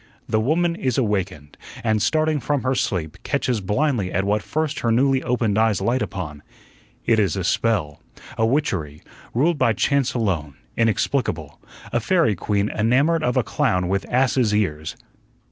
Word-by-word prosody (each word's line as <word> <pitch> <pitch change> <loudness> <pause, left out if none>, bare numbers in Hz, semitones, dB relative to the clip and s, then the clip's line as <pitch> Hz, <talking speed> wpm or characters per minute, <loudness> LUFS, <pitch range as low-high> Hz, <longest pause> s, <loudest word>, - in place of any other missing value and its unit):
The 110 - +1
Woman 170 +8 +1
is 130 -7 -1
awakened, 95 - -2 0.3
and, 110 -2 +1
starting 155 +2 +1
from 140 +2 -1
her 130 - +1
sleep, 85 -10 -2
catches 125 -5 -1
blindly 105 -1 0
at 95 - 0
what 105 +2 +1
first 155 +7 -2
her 115 - 0
newly 130 +3 +3
opened 120 -5 0
eyes 110 -3 +2
light 125 +2 0
upon. 75 -6 -5 0.6
It 115 -1 +3
is 100 -6 +1
a 95 - -2
spell, 90 -6 0 0.3
a 110 - 0
witchery, 95 - -1 0.3
ruled 150 +5 +2
by 115 -3 +3
chance 135 +5 +1
alone, 85 - -1 0.2
inexplicable 110 - 0 0.3
a 120 - +2
fairy 160 - +2
queen 100 +2 -1
enamored 140 +9 +2
of 125 -3 0
a 130 - +3
clown 90 -2 0
with 95 0 -1
ass's 125 -3 +2
ears. 80 -7 -1
115 Hz, 160 wpm, -22 LUFS, 95-135 Hz, 0.6 s, newly